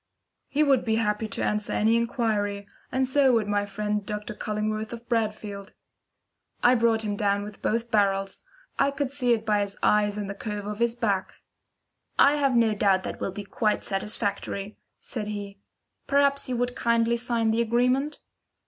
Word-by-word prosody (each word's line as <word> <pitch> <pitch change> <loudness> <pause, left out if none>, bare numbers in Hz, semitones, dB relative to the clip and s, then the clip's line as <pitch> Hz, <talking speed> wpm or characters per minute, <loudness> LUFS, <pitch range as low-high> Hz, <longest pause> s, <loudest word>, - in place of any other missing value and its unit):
"He 300 +2 +2
would 275 -4 +3
be 220 -1 +1
happy 215 -1 0
to - - -4
answer 210 0 0
any 220 +2 +3
inquiry, 215 -4 -1 0.2
and 260 0 +1
so 265 -1 +4
would 225 -3 +2
my 205 0 0
friend 210 +1 -2
Dr. 210 +2 -4
Cullingworth 215 +2 -3
of 235 0 -9
Bradfield." 210 -3 -2 0.9
I 245 - +7
brought 230 -2 +2
him 205 -1 -2
down 200 0 +1
with 210 0 -10
both 230 +1 -1
barrels. 195 -2 +1 0.4
I - - +4
could 280 -1 -2
see 255 -4 +1
it 225 -2 +1
by 210 -2 +2
his 200 0 -3
eyes 210 -1 +3
and 205 -1 -3
the 200 - -4
curve 205 0 -5
of 210 +1 -5
his 235 0 +1
back. 200 -6 -2 0.7
"I 285 +1 +6
have 275 -3 +2
no 230 -2 +4
doubt 195 -2 +2
that - - -3
that - - -13
will - - -1
be 205 +2 -6
quite 210 +1 0
satisfactory," 200 0 -3 0.2
said 215 -4 -5
he. 205 -1 -6 0.5
"Perhaps 280 -1 +2
you 250 - -1
would 245 +1 -1
kindly 235 -2 +2
sign 235 -2 0
the 225 +1 +2
agreement." 250 +5 +1
215 Hz, 180 wpm, -26 LUFS, 205-235 Hz, 0.9 s, I